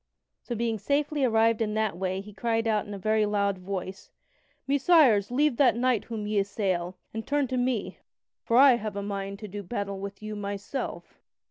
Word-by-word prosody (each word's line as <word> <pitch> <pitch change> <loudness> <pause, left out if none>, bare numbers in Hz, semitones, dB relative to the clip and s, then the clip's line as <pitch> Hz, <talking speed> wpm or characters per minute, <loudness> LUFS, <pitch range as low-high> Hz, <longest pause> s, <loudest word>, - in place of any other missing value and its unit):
So 240 - -5
being 225 -1 -1
safely 290 +5 0
arrived 225 -2 +3
in 215 -1 -1
that 215 -4 0
way 185 +1 -2
he 210 +1 -12
cried 225 +2 -1
out 215 -1 +1
in 205 - -6
a - - -6
very 215 +2 +1
loud 200 -2 0
voice: 190 0 -6 0.6
"Messires, 275 - +4
leave 275 +1 +2
that 265 -5 +5
knight 245 -3 +1
whom 220 -3 -5
ye 210 0 +1
assail, 190 -3 -1 0.2
and 225 0 -5
turn 290 -1 +1
to 260 - -2
me, 245 -4 -1 0.4
for 230 - +2
I 265 -2 +7
have 215 -2 -5
a 200 - -3
mind 200 -1 -4
to 210 - -6
do 205 +1 -6
battle 200 -1 -4
with 200 +1 -7
you 215 0 -5
myself." 200 +5 -5
215 Hz, 195 wpm, -27 LUFS, 200-240 Hz, 0.6 s, I